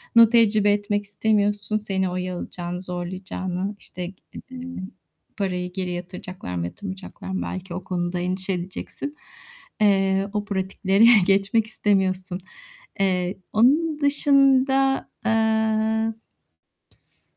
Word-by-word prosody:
nu 230 -1 +8
tecrübe 215 -3 +4
etmek 205 0 0
istemiyorsun 205 0 0
seni 195 -3 -1
oyalayacağını, 180 -1 -4
zorlayacağını, 185 +2 -4
işte, 180 +1 -6 0.4
ııı, 255 -1 -7 0.8
parayı 180 -3 -2
geri 185 -1 -3
yatıracaklar 180 - -6
mı 85 -1 -2
yatırmayacaklar 190 - -8
mı, 190 - -2
belki 185 -1 -5
o 185 +1 -5
konuda 175 -1 -2
endişe 185 +2 0
edeceksin. 185 +11 -5 0.7
Eee, 195 -1 +3
o 210 -1 -1
pratiklere 195 +1 +1 0.2
geçmek 200 +3 +3
istemiyorsun. 190 -4 0 0.6
Eee, 185 -1 +1 0.2
onun 295 +7 +3
dışında, 270 -1 +4 0.2
eee, 220 0 +2 0.8
s - - -8
195 Hz, 105 wpm, -23 LUFS, 185-220 Hz, 0.8 s, nu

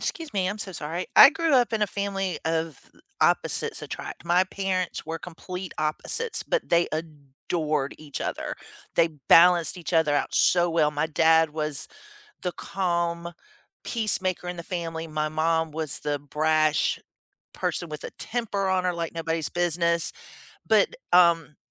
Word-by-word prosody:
'scuse 325 -3 -4
me. 190 -2 0
I'm 205 - -3
so 195 -3 -6
sorry- 165 +3 -4
I - - +12
grew 320 0 +1
up 245 -3 +3
in 215 - 0
a - - +3
family 195 -2 -3
of 160 -3 -1 0.4
opposites - - +1
attract. - - -7
My 175 +2 +3
parents 185 -2 -3
were 165 0 -4
complete 180 +2 -8
opposites, 155 - 0
but - - -1
they 170 0 +3
adored 150 -1 -3
each 150 -2 -7
other. - - -3 0.4
They 165 0 +4 0.2
balanced 175 0 +6
each 175 -2 -7
other 160 -3 +3
out - - -1
so 175 -1 +3
well. 155 -2 +2
My 150 +1 -1
dad 160 0 +4
was 150 -2 -2 0.6
the 180 - -2
calm, 170 -2 -2 0.5
peacemaker 185 -6 -1
in 180 - -6
the 170 - -6
family. 165 -2 -4
My 155 0 -2
mom 160 0 0
was 155 -2 -3
the 145 -1 -2
brash 155 +1 +1 0.5
person 175 - -2
with 150 -1 -7
a - - -6
temper 220 -4 -2
on 185 -1 +1
her 180 - +1
like 170 -1 -4
nobody's 165 -1 -2
business, 170 -1 +1 0.6
but, - - +3 0.2
um, 170 -4 +4
170 Hz, 155 wpm, -25 LUFS, 155-185 Hz, 0.6 s, I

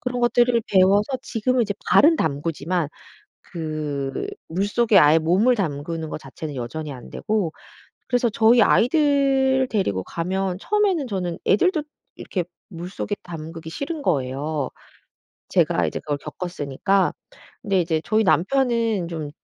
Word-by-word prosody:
그런 250 -1 -3
것들을 240 0 +3
배워서 200 +6 +3
지금은 250 +2 0
이제 205 -2 -2 0.2
발은 320 +3 +6
담그지만 160 - -1 0.6
그 155 - -3 0.2
물속에 205 +5 +2
아예 150 +2 +6
몸을 190 +10 +3
담그는 160 -3 -3
것 - - -4
자체는 145 +2 -8
여전히 140 +5 -5
안되고 175 - -3 0.6
그래서 245 -1 +2
저희 225 +2 +4
아이들을 270 0 +3
데리고 100 - 0
가면 185 +2 -2
처음에는 395 -9 +1
저는 180 -6 -3
애들도 315 - +3 0.3
이렇게 180 - -3 0.3
물속에 185 +3 -5
담그기 165 -1 -8
싫은 290 - -4
거예요. 145 - -1 0.8
제가 - - +2
이제 - - -3
그걸 145 -1 -2
겪었으니까. 175 +4 -1 0.5
근데 195 -3 +1
이제 160 -2 0
저희 220 +1 +2
남편은 225 - +1
좀 155 -4 -5
185 Hz, 305 characters per minute, -23 LUFS, 155-240 Hz, 0.8 s, 발은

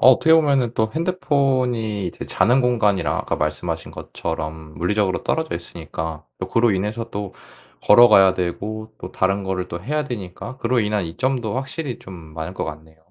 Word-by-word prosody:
어 - - +7
어떻게 160 +5 +4
보면은 140 -7 +3
또 110 0 +1
핸드폰이 130 - 0
이제 - - -6
자는 125 +3 +3
공간이랑 115 -6 +2
아까 - - -2
말씀하신 80 +2 -2
것처럼 80 -1 -5
물리적으로 100 +2 +1
떨어져 160 0 -1
있으니까 80 -2 -6
또 - - -4
그로 115 0 +3
인해서 105 +4 -2
또 100 -3 -5 0.5
걸어가야 105 -4 +7
되고 105 +5 -4
또 90 - -7
다른 95 +1 +1
거를 95 -1 -2
또 85 0 -6
해야 150 +7 -1
되니까 115 0 -6
그로 125 0 +1
인한 105 -2 0
이점도 120 +6 -1
확실히 135 0 -4
좀 95 - -11 0.2
많을 80 +3 -5
것 - - -2
같네요. 80 +1 -9
105 Hz, 375 characters per minute, -22 LUFS, 90-125 Hz, 0.5 s, 어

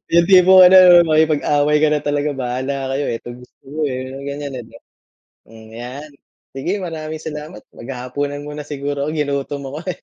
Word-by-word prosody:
Yung 170 0 +5
tipong 185 0 +7
ano 185 +1 +7 0.2
'no, 170 - +2
makikipag-away 150 -1 +2
ka 155 - +4
na 150 - 0
talaga, 145 0 -1
bahala 130 +1 -4
kayo, 145 +2 -2
eh. 115 - -2
Etong 120 0 -10
gusto - - -19
niyo, 150 +3 -5
eh. 130 -2 -3 0.2
Yung 140 +1 -8
ganiyan, 140 0 -6
eh, - - -7
di - - -21
ba? - - -19 0.7
Hmm, 110 -1 -15
'yan. 130 +6 -8 0.4
Sige, 135 +7 -3
maraming 160 -2 -6
salamat. 150 -7 -8
Maghahapunan 135 +3 -5
muna 150 0 -7
siguro 145 0 -4
ako, - - -2
ginutom 140 -1 -3
ako, - - -5 0.2
eh. - - -26
145 Hz, 190 wpm, -18 LUFS, 135-155 Hz, 0.7 s, tipong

